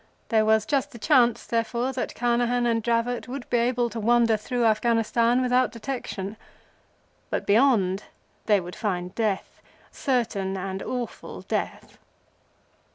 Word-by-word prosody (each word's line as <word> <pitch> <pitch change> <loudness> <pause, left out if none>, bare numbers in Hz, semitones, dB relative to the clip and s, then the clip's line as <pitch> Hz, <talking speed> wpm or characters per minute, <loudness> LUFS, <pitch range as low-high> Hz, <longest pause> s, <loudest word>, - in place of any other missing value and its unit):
There 220 -2 +3
was 220 0 +3
just 275 +3 0
the - - -9
chance, 245 -2 +3
therefore, 235 +3 -1
that 255 - -4
Carnehan 240 0 +1
and 230 -1 +1
Dravot 235 +2 -1
would 255 0 -6
be 240 - +3
able 240 0 +1
to 230 - -5
wander 230 0 +3
through 235 +3 -1
Afghanistan 230 +2 +2
without 250 0 +2
detection. 225 -5 -5 0.9
But, - - -2
beyond, 205 -4 +3 0.4
they 210 -2 +5
would 180 0 -8
find 180 -4 -3
death, 215 -4 -2 0.3
certain 210 -7 -1
and 190 0 -4
awful 250 -2 -5
death. - - -4
235 Hz, 135 wpm, -25 LUFS, 215-245 Hz, 0.9 s, they